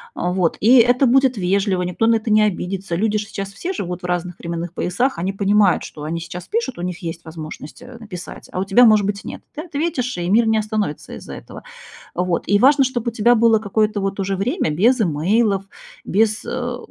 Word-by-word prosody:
А, 180 - -1
вот 180 -3 0
и 245 +5 +6
это 245 +3 +5
будет 260 -1 +3
вежливо, 190 0 +1
никто 180 +5 -1
на 230 - +5
это 220 0 -5
не 215 0 +5
обидится. 190 -2 -2
Люди 215 +3 +1
же 205 - -4
сейчас 195 -2 -6
все 350 - -4
живут 180 - -5
в - - -4
разных 175 0 -3
временных 170 0 -5
поясах, 210 +9 -1
они 190 +3 -2
понимают, 200 -1 +3
что 150 - -9
они 165 +2 -3
сейчас 175 +1 -8
пишут, 450 - -2
у - - -4
них 180 +1 -4
есть 165 0 -6
возможность, 155 -2 -9
э, 250 -1 -11
написать, 185 -6 -9
а 185 - -4
у - - +1
тебя, 225 +6 +6
может 215 -3 +5
быть, 200 0 -3
нет. - - -8
Ты 300 - -4
ответишь, 290 -6 -2
и 175 - -2
мир 225 +4 +4
не 220 0 +3
остановится 210 -7 -3
из-за - - -10
этого. - - -11 0.5
Вот 180 -1 0
и 205 0 +3
важно, 275 +2 +5
чтоб 245 -3 -3
у - - +1
тебя 235 +2 +3
было 230 -1 +4
какое-то 215 0 0
вот 195 +1 -3
уже 195 0 -1
время 245 - -1
без 230 - +3
имейлов, 195 +5 +1 0.4
без, 215 +2 +1
э, 245 -1 -3
205 Hz, 215 wpm, -20 LUFS, 180-235 Hz, 0.5 s, и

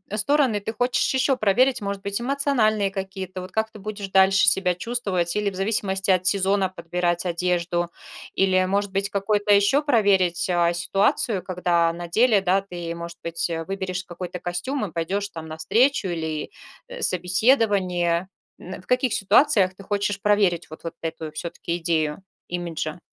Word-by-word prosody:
стороны 235 0 +2
ты 220 +3 -5
хочешь 245 +4 +1
ещё 265 0 +2
проверить? 250 +5 +3
Может 200 -2 -4
быть, 200 +2 -2
эмоциональные 240 -6 +1
какие-то? 190 -1 -6
Вот 185 +1 -9
как 220 +2 -1
ты - - -12
будешь 205 -1 -6
дальше 190 0 +4
себя 185 -1 +3
чувствовать 190 -5 -2
или 210 -1 0
в 190 - -11
зависимости 195 -1 -1
от 185 -1 +3
сезона 195 0 +2
подбирать 175 0 -2
одежду? 175 0 -1 0.4
Или, 185 -1 +2
может 200 +1 -1
быть, 195 +1 -1
какой-то 205 +1 +1
ещё 205 +9 +4
проверить, 195 - +2
а, 175 -1 +2
ситуацию, 195 +3 +1
когда 175 -2 +1
на 175 0 -7
деле, 220 +2 +3
да, 190 +1 +2
ты, 175 -3 -6
может 170 0 -8
быть, 170 +1 -1 0.2
выберешь 190 -1 -3
какой-то 180 0 -7
костюм 210 +9 -3
и - - -17
пойдёшь 195 +5 -2
там 160 -4 -8
на 155 0 -7
встречу 230 - +2
или 160 -3 -3 0.5
собеседование? 185 - +2 0.3
М, 185 0 -9
в - - -25
каких 250 -1 +1
ситуациях 200 -3 +3
ты 195 - -12
хочешь 205 0 -1
проверить 200 -5 +2
вот 155 - -11
вот 165 - -6
эту 160 -1 -5
всё-таки 170 +2 -4
идею 165 0 -1 0.2
имиджа? 170 -2 -4
190 Hz, 160 wpm, -23 LUFS, 175-205 Hz, 0.5 s, дальше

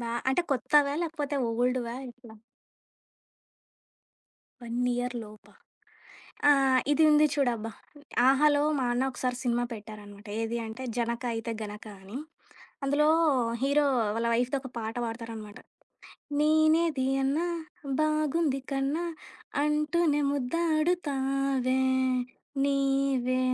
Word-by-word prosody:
బా 235 -1 -4 0.2
అంటే 350 +6 +2
కొత్తవా? 280 +1 +3
లేకపోతే 300 -3 -3 0.2
ఓల్డ్‌వా 245 0 0 0.2
ఎట్లా? 240 -2 -15 2.3
1 235 0 -6 0.2
ఇయర్‌లోపా! 240 -4 -5 1.0
ఆ! - - +9 0.4
ఇది 315 +2 +4
ఉంది 300 0 +6
చూడబ్బా. 235 -5 0 0.6
'ఆహాలో' 290 +2 +4 0.2
మా 255 - 0
అన్న 250 +2 +1
ఒకసారి 250 0 -2
సినిమా 240 0 +1
పెట్టారనమాట. 210 -1 -11
ఏది 230 +1 -2
అంటే 225 +4 -7
'జనక 235 +1 -1
అయితే 225 +1 -3
గనక' 210 +1 -8
అని. 200 +7 -8 0.7
అందులో 290 +2 +2 0.6
హీరో 285 +2 +3 0.3
వాళ్ళ 230 +1 0
వైఫ్‌తో 250 +4 +1
ఒక 260 - -8
పాట 225 0 -4
వాడతారనమాట. 225 -2 -7 0.8
నీనేది 310 -2 +3 0.2
అన్న 275 +3 +1 0.6
బాగుంది 310 -1 +1
కన్న 275 +2 0 0.7
అంటూనే 300 +1 +1
ముద్దాడుతావే 275 -3 0 0.8
నీవే 275 -2 +1
265 Hz, 95 wpm, -28 LUFS, 235-295 Hz, 2.3 s, ఆ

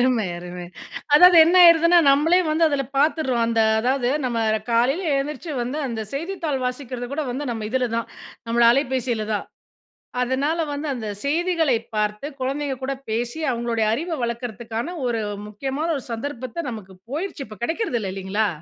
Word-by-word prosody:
அருமை, 245 -4 +2
அருமை! 180 0 -8 0.5
அதாவது 360 +3 +8
என்ன 340 +3 +3
ஆயிடுதுன்னா, 335 0 +7
நம்மளே 310 +6 +4
வந்து 315 +2 +2
அதுல 285 -2 0
பாத்துறோம். 280 -5 +2
அந்த 230 -1 +1 0.2
அதாவது, 250 +1 +1 0.2
நம்ம 240 -2 -1 0.3
காலைல 250 +9 +2
எழுந்திருச்சு 295 +3 -3
வந்து, 255 +6 -3
அந்த 230 -3 -4
செய்தித்தாள் 325 -3 -3
வாசிக்கிறது 250 -1 -4
கூட 310 +2 -1
வந்து 265 +4 -3
நம்ம 225 -2 -4
இதுலதான், 235 -2 -1 0.4
நம்மள 235 +1 +3
அலைபேசிலதான். 240 -5 -1 0.8
அதனால 275 +6 0
வந்து, 290 +2 -4
அந்த 225 -4 -5 0.2
செய்திகளைப் 315 -6 +1
பார்த்து, 210 +4 -1
குழந்தைங்க 275 +1 -2
கூட 275 +1 -1 0.2
பேசி, 240 +6 -2
அவங்களுடைய 235 -2 -1
அறிவ 335 +9 -4
வளர்க்கிறதுக்கான 235 +4 -4
ஒரு 230 -2 -1 0.3
முக்கியமான 270 +9 -3
ஒரு 265 - -9
சந்தர்ப்பத்த 255 +4 -5
நமக்கு 200 -5 -9 0.2
போயிருச்சு, 305 0 -4
இப்ப 215 -2 -11
கெடைக்றது 325 - -1
இல்ல 195 -3 -4
இல்லைங்களா? 195 +3 -1
255 Hz, 145 wpm, -23 LUFS, 230-300 Hz, 0.8 s, அதாவது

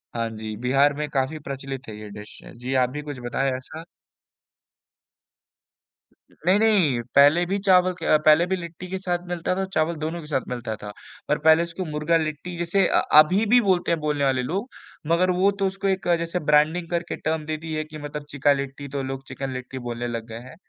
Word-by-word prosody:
हाँ 115 -1 -1
जी, 110 0 -5
बिहार 135 +4 +3
में 150 +1 -3
काफ़ी 140 +2 -1
प्रचलित 135 -2 -7
है 105 - -8
ये 105 -1 -9
डिश। 105 +1 -11
अ, - - -11
जी, 125 +3 -5
आप 125 -1 +3
भी 150 +3 -5
कुछ 145 -3 -7
बताया 130 +2 0
ऐसा। 155 +5 -10 2.5
नहीं, 185 +6 +1
नहीं, 185 - +3
पहले 145 +5 +6
भी 195 +3 -1
चावल 185 -2 +4
के 175 - -8
अ, 155 - +5
पहले 155 +3 +6
भी 190 - 0
लिट्टी 175 0 -8
के 190 - -3
साथ 175 -2 -2
मिलता 175 0 -2
था, 195 - -1
चावल 160 +2 +1
दोनों 165 +2 -3
के 150 - -11
साथ 140 -3 0
मिलता 120 -3 -4
था। 105 - -6 0.4
पर 150 - +2
पहले 160 +2 +5
उसको 170 +2 -5
मुर्गा 150 +2 +1
लिट्टी 155 +3 -4
जैसे 175 +3 +1
अ, - - +3
अभी 180 +8 +6
भी 245 +4 +5
बोलते 185 -5 +1
हैं 165 - +1
बोलने 150 -2 -1
वाले 130 -2 +2
लोग, 195 - -3 0.4
मगर 175 +3 +3
वो 185 +3 +3
तो 195 - +2
उसको 195 +1 -3
एक 190 -2 -1
जैसे 170 +2 -2
ब्रांडिंग 155 +4 +3
करके 170 0 -2
टर्म 160 -1 -2
दे 155 0 -3
दी 160 0 -7
है 155 - -1
कि 155 0 -10
मतलब 145 0 -7
चिका 145 0 +3
लिट्टी 140 +1 -5
तो 140 - -1
लोग 135 0 -5
चिकन 135 0 -5
लिट्टी 130 +1 -6
बोलने 120 +1 -3
लग 115 -1 -4
गए 115 0 -7
हैं, 130 +2 -12
155 Hz, 215 wpm, -24 LUFS, 135-175 Hz, 2.5 s, पहले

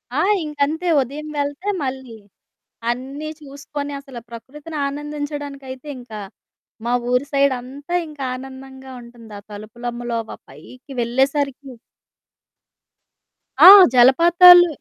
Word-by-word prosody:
ఆ! - - 0 0.2
ఇంకంతే. 300 +3 -2
ఉదయం 285 +4 -6
వెళ్తే 285 +7 -3
మళ్ళీ 260 -3 -6 0.7
అన్నీ 270 +5 -5
చూసుకొని, 285 0 -7
అసల 270 -3 -11
ప్రకృతిని 290 +7 -10
ఆనందించడానికైతే 290 -2 -7
ఇంక 245 -2 -14 0.7
మా 240 - -1 0.2
ఊరి 250 +3 +1
సైడంతా 275 +3 -1
ఇంకానందంగా 265 -1 -8
ఉంటుంది, 235 -2 -15
ఆ - - -15
తలుపులమ్మలోవ 235 +2 -6
పైకి 250 - -15
వెళ్ళేసరికి. 270 +3 -1 1.9
ఆ! - - +12 0.3
జలపాతాలు. 345 +8 +7
270 Hz, 90 wpm, -20 LUFS, 250-290 Hz, 1.9 s, ఆ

